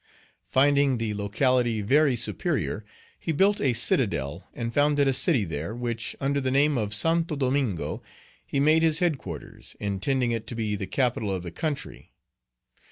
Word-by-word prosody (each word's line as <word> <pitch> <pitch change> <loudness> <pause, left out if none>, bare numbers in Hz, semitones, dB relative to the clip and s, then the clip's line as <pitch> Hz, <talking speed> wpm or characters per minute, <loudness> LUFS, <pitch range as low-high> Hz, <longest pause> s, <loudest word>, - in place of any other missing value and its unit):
Finding 140 -1 +3
the 115 -2 -2
locality 115 +2 0
very 140 +4 +3
superior, 120 - 0 0.4
he 165 - -3
built 195 +6 +2
a 130 -3 +2
citadel 100 - +1
and 115 0 -5
founded 145 0 +2
a 135 - +2
city 125 -4 +3
there, 80 +6 -5
which, 120 -2 -3
under 140 +1 0
the 130 - -1
name 140 +3 +2
of 105 -4 -2
Santo 165 +7 +2
Domingo, 130 - -1 0.4
he 140 - -3
made 155 +3 +4
his 160 -1 +4
headquarters, 140 - -4
intending 120 +6 -1
it 115 -1 -4
to 120 - -5
be 110 -2 -2
the 95 -2 -5
capital 120 -6 0
of 95 -2 -3
the 85 - -7
country. 150 - -5
125 Hz, 160 wpm, -26 LUFS, 105-145 Hz, 0.4 s, made